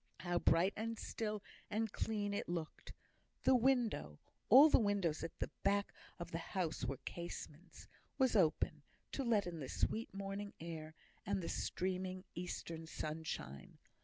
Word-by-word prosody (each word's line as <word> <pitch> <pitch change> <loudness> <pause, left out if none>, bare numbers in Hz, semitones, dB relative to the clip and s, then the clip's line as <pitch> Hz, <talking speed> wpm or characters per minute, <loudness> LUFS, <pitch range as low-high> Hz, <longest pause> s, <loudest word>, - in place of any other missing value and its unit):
How 175 0 +1
bright 175 +4 +4
and 225 +1 -2
still 210 -2 -3 0.3
and 220 0 0
clean 205 -2 -1
it 200 - -2
looked! 170 -3 -4 0.5
The - - +6
window 240 - +2 0.3
(all 270 +7 +11
the 305 - +6
windows 200 -7 +1
at 165 - -5
the - - -2
back 200 0 +2 0.2
of 170 -1 -6
the 165 - -2
house 165 -1 -2
were 135 - -1
casements) 170 -2 -7 0.3
was 260 -4 +3
open, 160 -6 +3 0.3
to 275 - -1
let 225 -4 +3
in 170 -2 -4
the 135 -3 -5
sweet 225 +1 0
morning 195 +1 -4
air, 160 -1 -6 0.3
and 195 -3 -1
streaming 185 0 -2
eastern 165 -2 -5
sunshine. 155 - -5
185 Hz, 145 wpm, -38 LUFS, 165-210 Hz, 0.5 s, all